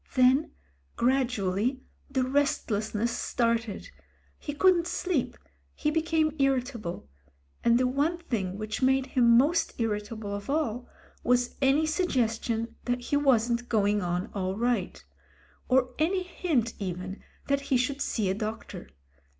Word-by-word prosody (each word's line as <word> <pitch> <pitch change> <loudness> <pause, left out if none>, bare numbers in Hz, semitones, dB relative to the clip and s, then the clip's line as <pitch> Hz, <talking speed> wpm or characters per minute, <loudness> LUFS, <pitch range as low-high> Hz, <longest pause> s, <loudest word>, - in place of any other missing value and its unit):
Then 260 +4 +4 0.5
gradually 250 -1 0 0.3
the 265 -2 +1
restless 255 -6 0
ness 230 +3 +1
started; 230 -4 -1 0.5
he 290 - -5
couldn't 345 +3 +3
sleep, 350 -9 -1 0.4
he 300 - 0
became 320 -1 +1
irritable, 250 - -1 0.3
— 70 0 -38
and 235 0 +5
the 255 - +2
one 285 +7 +1
thing 205 - -3
which 215 +2 -4
made 265 0 +3
him 235 -3 +4
most 300 +5 +2
irritable 210 -1 -3
of 205 +5 -6
all 255 -5 -1 0.3
was 245 0 +2
any 275 +3 +4
suggestion 235 - -1
that 245 0 0
he 265 - -1
wasn't 240 -4 +2
going 205 -2 +2
on 180 +3 -2
all 190 -1 -2
right; 240 +1 -1 0.6
or 255 0 +3
any 365 +4 +1
hint 310 -10 -1
even 185 0 -5 0.2
that 280 0 +1
he 260 - +4
should 270 +3 -1
see 215 -4 0
a 185 - +1
doctor. 215 - -6
245 Hz, 135 wpm, -28 LUFS, 215-280 Hz, 0.6 s, and